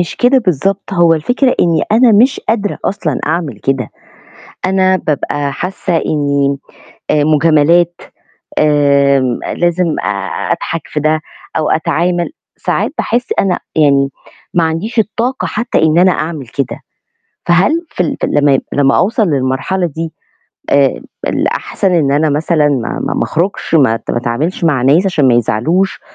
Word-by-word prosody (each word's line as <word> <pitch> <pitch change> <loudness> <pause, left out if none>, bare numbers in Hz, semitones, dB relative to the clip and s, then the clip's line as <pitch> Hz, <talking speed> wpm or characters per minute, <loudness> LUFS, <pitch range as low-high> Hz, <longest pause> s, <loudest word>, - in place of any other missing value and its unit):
مش 175 - -3
كده 255 +2 +4
بالضبط، 195 - -1
هو 170 -3 +4
الفكرة 245 - +1
إني 165 -3 +2
أنا 230 +1 +5
مش 245 +6 +3
قادرة 210 -3 -1
أصلًا 170 -8 -2
أعمل 155 - -2
كده، 135 +2 -1 0.8
أنا 190 0 +2
بابقى 145 -3 -2
حاسة 180 0 -2
إني 140 -3 0 0.5
آآ، 150 -1 +2
مجاملات 160 +3 +3 0.6
آمم، 140 -4 +2 0.2
لازم 175 -1 +1 0.6
أضحك 165 0 -2
في 150 - -3
ده 155 +1 +1 0.4
أو 155 - 0
أتعامل، 175 +2 0 0.3
ساعات - - -1
باحس 245 +1 -1
أنا 185 -2 +1 0.2
يعني 140 -3 +3 0.4
ما 170 - +2
عنديش 175 +9 -1
الطاقة 235 +5 -1
حتى 230 +3 -2
إن 160 +1 +3
أنا 185 +1 +5
أعمل 155 -6 -4
كده، 135 +3 -4 0.7
فهل 180 - +3 0.2
في 180 - -1
ال 165 - -2
في - - 0
ال - - -4
لمّا 145 -1 +3
ي 135 - +2
لمّا 140 -1 +3
أوصَل 215 +4 +2
للمرحلة 140 +6 -1
دي 165 +1 -5 0.6
آآ، 140 -2 +2 0.3
الأحسن 190 - -1
إن 150 -5 +2
أنا 150 +2 +2
مثلًا 150 +1 +1
ما 130 -5 -2
ما - - -1
ما - - 0
أخرُجش، 170 0 -1
ما 130 -7 +4
ات - - -5
ما - - -1
اتعاملش 130 +10 -2
مع 150 -6 +2
ناس 150 +9 +3
عشان 155 -8 +2
ما 125 - +4
يزعلوش، 155 - 0
160 Hz, 150 wpm, -14 LUFS, 140-185 Hz, 0.8 s, أنا